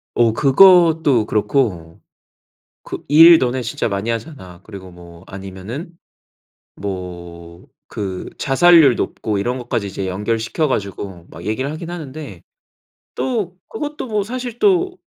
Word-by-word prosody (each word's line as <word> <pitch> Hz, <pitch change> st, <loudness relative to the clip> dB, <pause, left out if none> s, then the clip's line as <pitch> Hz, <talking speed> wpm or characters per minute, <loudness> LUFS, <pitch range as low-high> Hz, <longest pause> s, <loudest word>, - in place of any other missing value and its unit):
어, 115 Hz, -2 st, +3 dB
그것도 160 Hz, -, +5 dB
그렇고 105 Hz, -, -1 dB, 0.8 s
그 -, -, -8 dB
"일 165 Hz, +3 st, +8 dB
너네 125 Hz, -1 st, -1 dB
진짜 115 Hz, -, -2 dB
많이 100 Hz, +2 st, -3 dB
하잖아." 110 Hz, -, -7 dB
그리고 95 Hz, -3 st, -11 dB
뭐 85 Hz, 0 st, -15 dB
아니면은 100 Hz, -, -8 dB, 0.9 s
뭐 85 Hz, -3 st, -8 dB, 0.3 s
그 95 Hz, -3 st, -5 dB
자살률 150 Hz, 0 st, +5 dB
높고 105 Hz, -2 st, -3 dB
이런 120 Hz, +6 st, -2 dB
것까지 120 Hz, -4 st, -3 dB
이제 95 Hz, 0 st, -5 dB
연결시켜 115 Hz, -, -1 dB
가지고 100 Hz, -, -4 dB
막 85 Hz, +2 st, -12 dB
얘기를 110 Hz, +7 st, -2 dB
하긴 165 Hz, +2 st, -7 dB
하는데. 155 Hz, -3 st, -8 dB, 0.7 s
또 215 Hz, -9 st, -2 dB
그것도 295 Hz, +3 st, -5 dB
뭐 210 Hz, -3 st, -1 dB
사실 245 Hz, +2 st, -6 dB
또 370 Hz, -2 st, +2 dB
120 Hz, 255 characters per minute, -19 LUFS, -, 0.9 s, 일